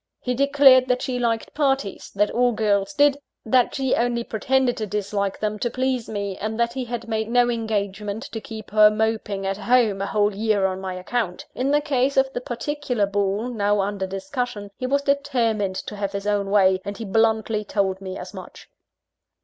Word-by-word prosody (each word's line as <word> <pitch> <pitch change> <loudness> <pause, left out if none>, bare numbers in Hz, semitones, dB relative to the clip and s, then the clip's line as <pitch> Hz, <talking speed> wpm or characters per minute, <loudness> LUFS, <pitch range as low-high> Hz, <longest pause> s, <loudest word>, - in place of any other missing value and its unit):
He 250 - -2
declared 275 -1 +5
that 250 0 0
she 250 -1 -2
liked 230 -2 -1
parties 270 -8 -1
that 210 +1 +2
all 245 0 +2
girls 205 -3 +1
did 285 -1 +4 0.3
that 245 +2 +3
she 265 -2 0
only 235 0 +1
pretended 255 +3 +1
to 215 - -3
dislike 200 -1 -2
them, 215 0 -2
to 240 - 0
please 255 -1 -1
me 200 -2 -3
and 220 +2 -4
that 235 0 +1
he 260 -2 -3
had 235 -1 -5
made 220 -1 -2
no 245 0 +3
engagement 210 -1 -3
to 225 - -5
keep 220 -2 -9
her 210 0 +7
moping 215 -2 -1
at 195 0 -1
home 225 -4 +2
a 200 - -1
whole 205 0 +1
year 210 -1 +1
on 190 0 -2
my 190 -1 -4
account. 185 0 -3
In 260 +2 -1
the 295 +1 +3
case 275 -2 0
of 265 0 +3
the 245 - -3
particular 250 -2 -2
ball 200 +3 -1
now 205 -3 +1
under 195 -1 -1
discussion, 205 0 -4
he 255 - -4
was 280 +2 +1
determined 240 -9 0
to 210 - -6
have 200 -1 -3
his 200 0 -4
own 205 -1 0
way; 190 -2 +4
and 200 0 -6
he 225 - -6
bluntly 220 0 +1
told 195 -2 -1
me 190 -1 -6
as - - -8
much. - - -11
220 Hz, 200 wpm, -23 LUFS, 200-250 Hz, 0.3 s, her